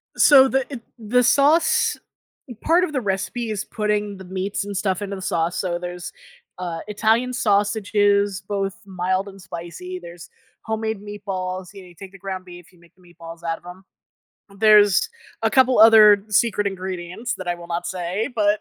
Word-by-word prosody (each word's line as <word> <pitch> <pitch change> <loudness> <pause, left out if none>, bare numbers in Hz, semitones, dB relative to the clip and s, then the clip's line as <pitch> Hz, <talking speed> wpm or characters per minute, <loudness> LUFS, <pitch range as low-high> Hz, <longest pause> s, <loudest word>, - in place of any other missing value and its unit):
So, 270 -2 +7
the 265 +1 -1
eh 270 - -4 0.2
the 240 +3 +2
sauce 290 +6 +3 0.6
part 340 +3 +3
of 360 - -2
the 260 - -1
recipe 215 +3 -3
is 205 -2 -3
putting 210 -2 -2
the 190 - -11
meats 190 +2 -3
and 205 0 -6
stuff 190 -1 -1
into 200 -1 -4
the 190 - -8
sauce, 170 -1 -1
so 175 -2 -2
there's, 180 0 -7 0.5
uh, 175 -2 -4
Italian 225 +4 +1
sausages, 205 -3 +1
both 195 -2 -2
mild 185 +1 -2
and 195 -1 -12
spicy, 180 +1 -8
there's 170 -1 -11 0.4
homemade 220 -1 -3
meatballs, 190 -3 -6
y'know 195 -2 -12
you 175 - -17
take 195 +2 -11
the 195 - -14
ground 190 -1 -6
beef, 175 -1 -13
you 180 - -24
make 170 0 -23
the 185 - -26
meatballs 170 -1 -13
out 165 -1 -2
of - - -23
'em. 180 +2 -11 0.8
There's 210 - +5 0.3
a - - +2
couple 260 -1 +4
other 215 -2 +7
secret 210 -1 +1
ingredients 190 +4 -4
that 185 -1 -6
I 175 - 0
will 175 0 -11
not 170 0 -3
say, 185 +5 -3
but 210 -1 +2
195 Hz, 175 wpm, -22 LUFS, 180-215 Hz, 0.8 s, So